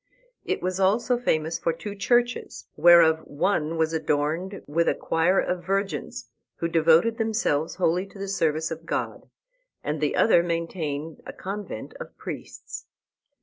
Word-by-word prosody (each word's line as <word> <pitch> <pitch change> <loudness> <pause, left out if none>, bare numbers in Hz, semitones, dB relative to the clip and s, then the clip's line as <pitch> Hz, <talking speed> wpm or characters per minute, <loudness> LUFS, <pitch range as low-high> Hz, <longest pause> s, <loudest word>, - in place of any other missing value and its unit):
It - - -2
was 185 +1 -1
also 215 +6 +2
famous 160 -7 0
for 165 - +1
two 200 +5 -7
churches, 240 +4 0
whereof 165 0 +6
one 160 +1 0
was 160 0 +1
adorned 160 +5 -1
with 165 +3 0
a - - +1
choir 165 +4 +2
of 180 -1 -1
virgins, 195 +2 -2 0.3
who 165 - -2
devoted 165 +7 +3
themselves 215 -9 0
wholly 180 +1 +1
to 200 - -15
the 195 0 -5
service 160 -4 0
of 165 +1 -7
God, - - -3 0.5
and 150 +1 -3
the 150 - +1
other 210 -6 +5
maintained 165 -3 -3
a - - -6
convent 195 - -6
of - - -9
priests. - - -8
170 Hz, 150 wpm, -25 LUFS, 160-195 Hz, 0.5 s, whereof